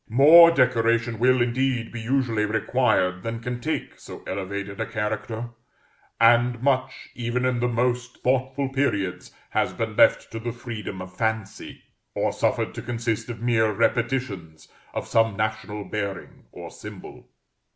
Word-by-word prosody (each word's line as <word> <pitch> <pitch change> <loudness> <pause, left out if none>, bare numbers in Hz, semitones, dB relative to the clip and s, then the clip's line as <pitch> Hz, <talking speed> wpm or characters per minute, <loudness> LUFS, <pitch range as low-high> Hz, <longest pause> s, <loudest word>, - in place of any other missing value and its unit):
More 155 +8 +8
decoration 115 -5 +2
will, 130 0 +4
indeed, 125 -1 -1
be 120 - -6
usually 115 -2 0
required 105 -4 +1
than 115 +3 -4
can 120 +1 -4
take 160 +4 -4
so - - -11
elevated 100 +2 -5
a - - 0
character; 110 +2 -3 0.7
and 120 +1 +4
much, 130 -1 0
even 120 +1 -2
in 125 -1 +1
the 125 - +1
most 125 +1 -1
thoughtful 130 +1 0
periods, 105 -9 -1 0.2
has - - 0
been - - -3
left - - +4
to 115 - -5
the 120 +1 -4
freedom 110 -6 -6
of 95 0 -13
fancy, 110 -3 -3 0.3
or - - 0
suffered - - 0
to 120 - -6
consist 115 -1 -3
of 115 -1 -7
mere 110 -2 +2
repetitions 115 -7 -1 0.3
of - - -3
some 115 -3 +2
national 110 -1 -3
bearing 100 -3 -5
or - - -9
symbol. - - -11
115 Hz, 145 wpm, -24 LUFS, 110-125 Hz, 0.7 s, More